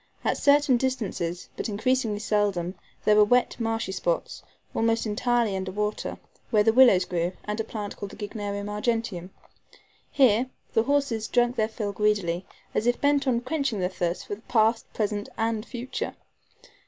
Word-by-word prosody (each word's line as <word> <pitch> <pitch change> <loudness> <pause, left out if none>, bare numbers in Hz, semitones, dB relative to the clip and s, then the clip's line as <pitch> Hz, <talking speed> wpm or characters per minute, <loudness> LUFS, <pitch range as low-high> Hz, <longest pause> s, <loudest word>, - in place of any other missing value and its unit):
At - - +2
certain 285 -3 +5
distances, 200 -9 -2
but - - -3
increasingly 220 +1 0
seldom, 205 -4 0 0.3
there 210 - +5
were 210 - +7
wet, 245 +4 +2
marshy 225 -3 -1
spots, - - -2 0.3
almost 225 0 +1
entirely 230 0 +1
under 190 0 -3
water, 210 +2 -2 0.3
where 210 -3 +4
the 225 +1 +4
willows 230 -8 +6
grew, 175 0 -1
and 210 +1 -3
a - - +1
plant 210 -2 -6
called 205 - -6
the - - -11
Gygnerium 205 -1 -4
argenteum. 210 -4 -2 0.8
Here 250 -2 +4 0.2
the 225 - +3
horses 275 -6 +1
drank 240 0 +2
their 215 -3 +1
fill 215 -2 -3
greedily, 195 -4 0 0.3
as 225 - 0
if 245 - +2
bent 285 -1 +2
on 240 -2 +2
quenching 270 -4 -1
their 180 0 0
thirst 175 -2 -2
for 205 - -5
past, 225 +1 +1
present 210 -1 -2
and 225 -1 0
future. 245 +2 -5
220 Hz, 160 wpm, -26 LUFS, 205-240 Hz, 0.8 s, were